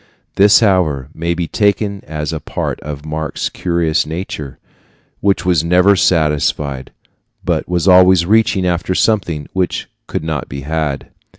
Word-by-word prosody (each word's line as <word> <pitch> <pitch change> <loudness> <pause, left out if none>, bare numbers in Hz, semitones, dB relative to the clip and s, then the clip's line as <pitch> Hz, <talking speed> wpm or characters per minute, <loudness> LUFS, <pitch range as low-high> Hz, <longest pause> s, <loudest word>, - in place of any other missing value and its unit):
This, 100 +3 +5
however, 90 - +1
may 85 +1 -2
be 85 -1 -2
taken 100 0 0
as 75 +1 -4
a 80 - -3
part - - -4
of 75 0 -7
Marx's 80 0 -3
curious 85 -3 0
nature, 75 -4 -6 0.6
which 100 -2 +1
was 85 -4 +2
never 90 +4 +4
satisfied, 75 -6 0 0.5
but - - -1
was 90 0 0
always 90 -1 +6
reaching 105 -2 +2
after 90 +1 -1
something 85 -10 0
which 90 -2 -2 0.2
could - - -4
not 80 -3 -3
be 70 0 -6
had. 75 -1 -3
85 Hz, 140 wpm, -16 LUFS, 75-95 Hz, 0.6 s, always